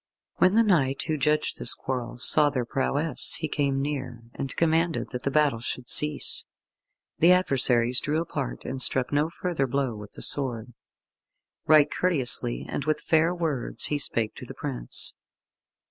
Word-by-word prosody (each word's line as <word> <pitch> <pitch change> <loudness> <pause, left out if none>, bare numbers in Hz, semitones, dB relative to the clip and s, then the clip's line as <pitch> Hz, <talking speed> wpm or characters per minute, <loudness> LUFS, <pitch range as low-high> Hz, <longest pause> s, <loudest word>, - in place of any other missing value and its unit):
When 185 +2 +3
the 230 - +5
knight 140 -10 +1
who 155 - -2
judged 150 +2 -1
this - - 0
quarrel 125 -2 -5
saw 150 +4 +5
their 130 -4 -3
prowess, 140 +4 -1
he 155 - -4
came 140 -2 -1
near, 130 -5 -5
and 135 -1 -6
commanded 165 0 0
that 125 -1 -5
the - - -2
battle 145 -4 +1
should 125 +1 -5
cease. 150 0 +3 0.7
The 170 +3 +5
adversaries 125 -8 +3
drew 150 +2 -2
apart, - - -5
and 130 0 -5
struck 130 +1 0
no 150 +2 +1
further 170 -5 -3
blow 135 -1 -2
with 105 -1 -11
the - - -5
sword. 125 -4 -2 0.9
Right 150 -1 +6
courteously 125 - +1
and - - -4
with 155 -1 0
fair 165 +3 +1
words 155 -8 +1
he 145 - 0
spake 115 -5 0
to - - -9
the - - -10
prince. - - 0
140 Hz, 160 wpm, -25 LUFS, 125-155 Hz, 0.9 s, Right